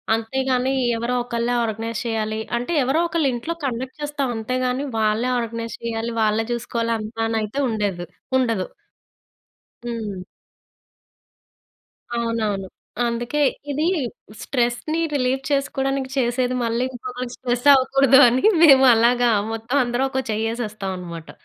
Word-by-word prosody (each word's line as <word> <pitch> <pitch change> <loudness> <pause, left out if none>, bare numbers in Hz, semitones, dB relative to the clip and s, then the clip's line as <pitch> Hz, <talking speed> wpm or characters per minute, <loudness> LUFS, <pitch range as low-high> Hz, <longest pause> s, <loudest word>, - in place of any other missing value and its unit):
అంతేగాని 260 +3 0 0.2
ఎవరో 240 +2 -1
ఒకళ్ళే 235 0 -1
ఆర్గనైజ్ 225 +1 -3
చేయాలి 220 -1 -2 0.2
అంటే 245 +8 -4
ఎవరో 270 +6 +1
ఒకళ్ళ 335 -4 0
ఇంట్లో 280 +8 -3
కండక్ట్ 260 +3 -4
చేస్తాం. 290 -3 -2
అంతేగాని 255 +3 -1
వాళ్ళే 220 +3 +1
ఆర్గనైజ్ 230 0 -4
చేయాలి. 230 0 -2
వాళ్ళే 215 +1 +2
చూసుకోవాలంతా 230 -1 -3
అని 225 0 -1
అయితే 215 +7 -3
ఉండేదు 200 -5 -2 0.3
ఉండదు. 230 -7 0 1.2
హ్మ్. 215 -5 -4 2.0
అవునవును. 220 -4 -1 0.4
అందుకే 240 +5 -2 0.3
ఇది 300 +3 0 0.6
స్ట్రెస్‌ని 250 +5 -1
రిలీఫ్ 265 0 0
చేసుకోవడానికి 270 -1 0
చేసేది 250 0 +1
మళ్ళీ 230 +2 0
ఇంకొకరికి 250 0 -6
స్ట్రెస్ 245 +1 -2
అవ్వకూడదని 265 -1 +5 0.2
మేము 270 -3 +8
అలాగా 240 +1 +3 0.2
మొత్తమందరం 245 +2 0
ఒక 265 0 -1
చెయ్యేసేస్తామన్నమాట. 205 -7 -4
240 Hz, 105 wpm, -22 LUFS, 225-260 Hz, 2.0 s, మేము